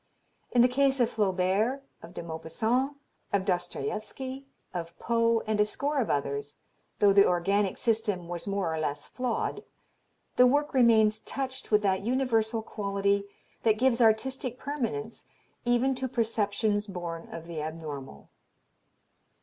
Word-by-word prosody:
In 240 -1 +5
the - - +7
case 270 +1 +2
of 240 - +3
Flaubert, 205 +6 +1 0.2
of 170 +2 -12
De - - -5
Maupassant, 220 - -1 0.3
of 195 -1 +1
Dostoievsky, 215 +8 -3 0.3
of 170 -1 -5
Poe, 230 -1 +2
and 215 -1 0
a - - +7
score 285 +7 -1
of 235 - 0
others, 140 0 -2 0.4
though 200 -1 +5
the 200 0 +6
organic 195 +3 +1
system 210 -6 0
was 175 +2 -5
more 195 -5 -1
or 160 - -2
less 145 -2 -2
flawed, 250 -3 -2 0.7
the 250 - +8
work 290 +4 +1
remains 220 -4 +5
touched 260 +2 -5
with 210 -1 +3
that 190 -1 +2
universal 225 -2 +1
quality 200 -1 0 0.4
that 220 -2 +3
gives 250 0 +3
artistic 245 +3 +2
permanence 230 -6 -4 0.4
even 245 +2 +3
to 260 0 -3
perceptions 215 -3 0
born 175 -3 -5
of 165 0 -7
the 165 -2 -5
abnormal." 150 - -7
215 Hz, 140 wpm, -28 LUFS, 180-245 Hz, 0.7 s, the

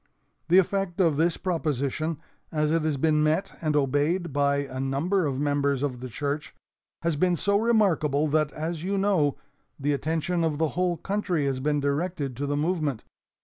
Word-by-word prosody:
"The 175 - +6
effect 190 -1 +1
of 165 -5 +3
this 165 +2 +2
proposition, 155 -3 -1 0.3
as 150 -1 +1
it 165 0 +2
has 155 -2 0
been 155 +2 +2
met 155 +5 +1
and 155 -2 0
obeyed 145 +4 +1
by 140 0 +1
a 130 -1 -7
number 150 +7 0
of 135 -1 -2
members 140 -1 +1
of 130 -4 -2
the 130 +1 -6
church, 145 +4 -4 0.5
has 165 -2 +1
been 180 +4 +2
so 200 +5 +2
remarkable 175 -10 +2
that, 155 0 +1
as 160 +1 -4
you 195 +2 -1
know, 190 -8 +2 0.4
the 145 +1 +1
attention 165 +4 -1
of 155 -3 0
the 160 0 +1
whole 180 0 0
country 195 -6 -1
has 135 -2 -1
been 145 +2 +1
directed 145 -1 -1
to 145 +1 -2
the 145 0 0
movement. 155 -5 -1
155 Hz, 180 wpm, -26 LUFS, 145-175 Hz, 0.5 s, The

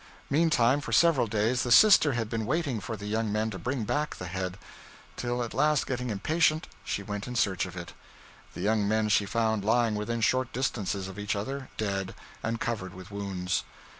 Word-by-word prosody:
Meantime, 145 -4 +3
for - - -6
several 165 -8 +4
days, 110 +4 +1
the 120 - -2
sister 155 - +7
had 115 -2 -1
been 110 -1 -3
waiting 145 -4 0
for 110 0 -5
the 100 - -8
young 110 +1 -1
men 110 +1 0
to 95 - -6
bring 125 +5 -2
back 145 +7 -1
the 90 - -7
head; 90 +1 -4 0.6
till, 120 0 -2
at 115 - -6
last, 150 +2 +2
getting 125 -1 -3
impatient, 155 +9 +1 0.2
she 100 - -3
went 100 0 -5
in 125 - -5
search 95 -6 +1
of 90 0 -10
it. 85 -1 -7 0.6
The - - -5
young 105 +1 +2
men 110 0 +1
she 105 -1 +3
found 110 -1 0
lying 115 +1 +2
within 115 +3 -2
short 130 +2 +2
distances 105 -6 -2
of 95 +1 -8
each 105 +1 -1
other, 130 +6 -4
dead, 95 -3 -2 0.3
and 115 +1 -2
covered 95 -6 -3
with 95 +2 -11
wounds. 95 -3 -2
110 Hz, 195 wpm, -28 LUFS, 100-125 Hz, 0.6 s, sister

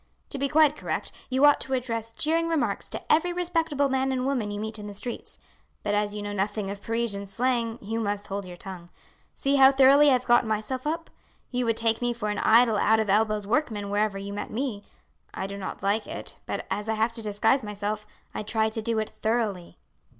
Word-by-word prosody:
To 275 - -4
be 280 +1 0
quite 305 0 +5
correct, - - -3 0.2
you 260 +2 +4
ought 290 - +6
to 265 - -1
address 230 -3 -3
jeering 325 +7 +1
remarks 255 -12 -1
to - - -4
every 330 +3 +2
respectable 330 -5 0
man 265 0 0
and 255 -1 -1
woman 255 -6 0
you 205 0 -4
meet 220 0 -4
in 210 - -7
the 205 - -7
streets; 235 +4 -4 0.5
but 205 - 0
as 205 0 0
you 205 - -4
know 205 0 -4
nothing 205 0 -2
of 200 0 -7
Parisian 225 -2 -2
slang, 235 +1 0
you 225 +3 -2
must 205 -2 -2
hold 200 -1 -4
your 175 -1 -9
tongue. 175 -2 -8 0.5
See 275 +1 +1
how 265 0 +8
thoroughly 275 +2 +6
I - - +5
have 250 0 +1
got 240 0 +5
myself 220 +5 -2
up. 325 +1 -3 0.4
You 250 -1 0
would 230 -1 +1
take 225 0 +1
me 240 0 +1
for 220 -3 -3
an 210 - -2
idle 225 -1 +5
out 220 +2 +4
of 215 -3 +1
elbows 215 0 +2
workman 215 -4 -1
wherever 205 -1 +1
you 200 +1 -6
met 205 - -4
me. 235 -3 -3 0.5
I 190 - -3
do 200 +1 -5
not 195 -1 -6
like 205 +2 +1
it; - - -8
but, - - -3
as 205 +3 -2
I 220 - +1
have 220 +2 +1
to 230 0 -5
disguise 220 +5 +2
myself, 210 0 -4 0.3
I - - -3
try 220 +1 0
to 220 0 -4
do 230 0 -1
it 215 -1 0
thoroughly." 210 -7 -2
220 Hz, 225 wpm, -26 LUFS, 205-260 Hz, 0.5 s, how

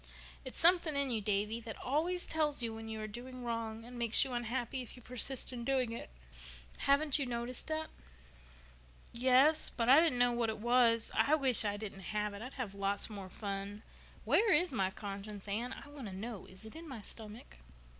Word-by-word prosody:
"It's 260 - -8
something 340 -3 +4
in 280 -2 +1
you, 225 -2 +1
Davy, 210 +2 0
that 225 -1 -8
always 335 +7 -1
tells 300 -5 0
you 230 -1 -1
when 225 0 -7
you 220 0 -4
are - - -3
doing 250 +3 -8
wrong 230 -1 -3
and 245 0 -9
makes 230 -1 +6
you 260 - -5
unhappy 245 +2 -2
if 245 - -10
you 250 - -13
persist 250 +1 +1
in 240 -1 -5
doing 255 -2 +1
it. 230 - -6 0.7
Haven't 285 +1 +3
you 275 - -1
noticed 240 +1 -4
that?" 315 0 -2 1.2
"Yes, 260 +6 +4
but 235 0 -1
I 275 +4 +9
didn't 320 -6 +3
know 245 0 +4
what 235 -1 0
it 220 - -3
was. 235 0 +3
I 300 - +4
wish 265 -7 +4
I 205 -1 -1
didn't 205 -2 -7 0.2
have 210 0 -1
it. 200 - -8
I'd 250 +3 -7
have 240 -7 -5
lots 200 +2 0
more 195 -3 -7
fun. 200 +1 -5 0.4
Where 435 -1 +4
is 340 -1 +3
my 190 -6 +1
conscience, 200 +1 -7
Anne? 230 +5 -2
I 275 - -9
want 285 -5 -8
to 195 - -7
know. 220 +1 -6
Is 190 +3 -14
it 220 - -11
in 325 0 -9
my 245 -5 -7
stomach?" 215 - -9
240 Hz, 205 wpm, -34 LUFS, 215-270 Hz, 1.2 s, I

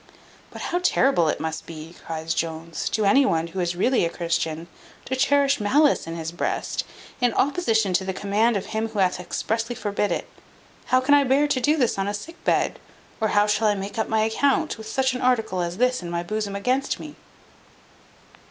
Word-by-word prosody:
"But - - -8
how 355 - -1
terrible 265 - +3
must 160 0 -4
it - - -25
be," 165 +1 -9
cries 160 0 -3
Jones, 165 0 -3
"to 215 - 0
any 270 +8 +5
one 165 -11 +1
who 170 +3 -6
is 175 -1 -1
really 245 +7 +2
a 170 - +1
Christian, 165 -1 -2 0.4
to 260 - -2
cherish 280 +1 +3
malice 275 - +3
in 165 - -5
his 165 -1 -4
breast, 175 - -2 0.4
in 245 -2 +2
opposition 225 - +1
to 185 - +2
the 190 - -2
command 205 +4 +1
of 195 - -4
Him 220 +1 -2
who 220 -1 -9
hath 185 -2 +2
expressly 225 +6 -2
forbid 205 -1 -1
it? - - -2 0.6
How 255 0 +3
can 275 +3 +3
I 285 -1 +6
bear 275 +3 +3
to 275 -3 0
do 300 +5 +3
this 245 -7 +1
on 195 - 0
a 205 - -1
sick 330 +12 -10
bed? - - +1 0.4
Or 220 - +1
how 205 0 +3
shall 210 +1 +2
I 210 - +3
make 200 +2 -5
up 220 - -1
my 220 0 +2
account, 275 +7 +1
with 220 - -8
such 260 +1 +1
an 255 - -4
article 225 -7 +1
as 175 +1 -3
this 250 0 +2
in 175 - -6
my 170 0 -2
bosom 205 +2 -3
against 255 +7 0
me?" 300 -1 -9
215 Hz, 205 wpm, -24 LUFS, 175-255 Hz, 0.6 s, I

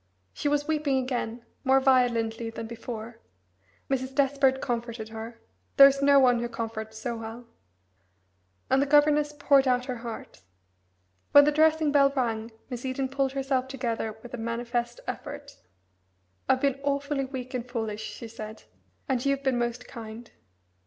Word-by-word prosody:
She - - -3
was 290 0 +1
weeping 300 -3 +1
again, 245 -2 -3 0.2
more 265 0 +5
violently 235 -4 +2
than 225 0 -6
before; 230 0 -7 0.7
Mrs. 265 0 -2
Despard 270 -1 +3
comforted 235 -3 -4
her 225 +1 -8 0.4
there 275 - +11
is 275 0 0
no 280 0 +6
one 250 -2 +4
who 240 0 -3
comforts 220 -1 -5
so 235 +2 -3
well 225 +2 -8 1.2
and 265 +1 +3
the 285 - +1
governess 295 +1 +4
poured 285 -2 +3
out 250 0 +2
her 255 -2 -4
heart. 230 -1 -8 0.9
When 285 - +10
the 300 - +3
dressing 315 0 +3
bell 280 -1 +5
rang 225 -3 -1 0.2
Miss 245 -2 -6
Eden 265 0 -2
pulled 270 0 0
herself 270 -1 0
together 230 -4 -3
with 245 - -11
a - - -3
manifest 235 +1 -2
effort. - - -7 0.9
"I've 260 0 +3
been 275 -1 +1
awfully 280 0 -1
weak 260 -1 -7
and 250 -1 -4
foolish," 220 -3 -3
she 230 +1 -7
said, 220 -1 -9 0.4
"and 255 -3 0
you've 275 0 0
been 260 -3 +1
most 240 +1 -3
kind. 225 0 -9
255 Hz, 155 wpm, -27 LUFS, 230-275 Hz, 1.2 s, there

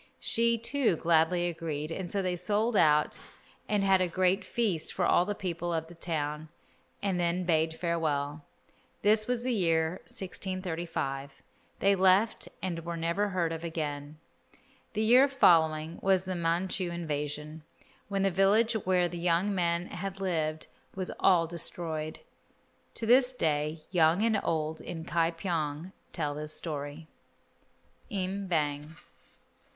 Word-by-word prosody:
She, 235 0 +2
too, 235 -2 +1
gladly 170 +2 +2
agreed, 155 -2 -4
and 175 +1 -4
so 195 +1 0
they 180 -1 0
sold 215 +5 +1
out 150 -5 +4 0.5
and 205 -2 +2
had 190 -1 +4
a 185 - +2
great 185 +2 +1
feast 205 -9 -1
for - - 0
all 175 - +4
the 205 +1 -2
people 175 -3 -3
of 160 -1 -1
the - - -11
town, 155 -2 -3 0.5
and 190 -3 0
then 175 +1 0
bade 160 -2 +1
farewell. 155 -4 -1 0.6
This 215 +1 +4
was 245 -1 -1
the 255 0 0
year 165 -4 +1
1635. 170 -8 -4 0.4
They 200 0 +5
left 190 +3 +3 0.2
and 170 -3 -3
were 170 0 -4
never 170 +5 0
heard 175 -3 0
of 165 0 -6
again. 150 -3 -4 0.8
The 215 0 0
year 250 +5 +6
following 160 - +3
was 190 -1 +3
the 185 -1 -3
Manchu 175 +2 -1
invasion, 150 -2 -4 0.5
when 195 -1 -1
the 195 - +2
village 205 +5 +3
where 185 -4 +1
the 175 0 -6
young 175 +4 +1
man 170 -2 0
had 195 +1 -5
lived 160 -5 -1 0.3
was 185 -1 -3
all 175 -3 +4
destroyed. 160 -2 -2 0.7
To 230 - -2
this 250 +2 +5
day 155 -6 -1
young 170 +2 +4
and 220 -2 +2
old 160 -1 -1
in 165 -2 -6
Ka 165 -1 +1
pyong 165 -1 -3 0.2
tell 150 -4 -2
this 150 +1 -4
story. 150 0 -5 1.0
Im 195 0 -3
Bang. 150 -2 -1
170 Hz, 145 wpm, -29 LUFS, 160-195 Hz, 1.0 s, year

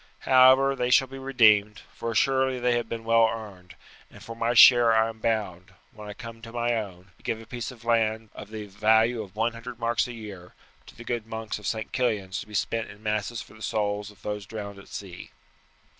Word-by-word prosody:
However, 130 +1 +5
they 125 -1 -1
shall 135 +1 +4
be 135 +1 -9
redeemed, 110 -6 +3
for 115 - -5
assuredly 130 +2 +1
they 120 0 +1
have 120 - -2
been 115 -1 -5
well 115 0 +4
earned, 100 -6 -9 0.3
and - - -15
for 115 - -8
my 115 +1 -1
share 120 -1 +8
I 110 0 +3
am 110 -1 -10
bound, 105 -6 -2 0.2
when 105 -1 -10
I - - -6
come 115 +1 -10
to 115 0 -10
my 120 0 0
own, 95 -5 -5
to - - -26
give 110 - -2
a 115 - -12
piece 120 +1 -6
of 120 -3 -13
land 110 -2 0
of 105 - -10
the 110 -1 -7
value 110 +3 +2
of 100 -2 -11
one 115 +2 0
hundred 120 +1 -9
marks 115 +1 0
a 120 - -7
year 100 -6 -10 0.3
to - - -14
the 120 - -11
good 120 -2 -4
monks 110 -1 -5
of 105 - -7
St. 110 -1 -3
Killian's 105 -7 -1
to - - -8
be 105 - -10
spent 115 +3 -1
in 105 +1 -14
masses 110 +1 -2
for - - -18
the 110 - -16
souls 105 -1 -2
of 105 - -19
those 105 -2 -5
drowned 100 -2 -7
at 100 - -15
sea." 95 -3 -9
110 Hz, 225 wpm, -26 LUFS, 105-120 Hz, 0.3 s, share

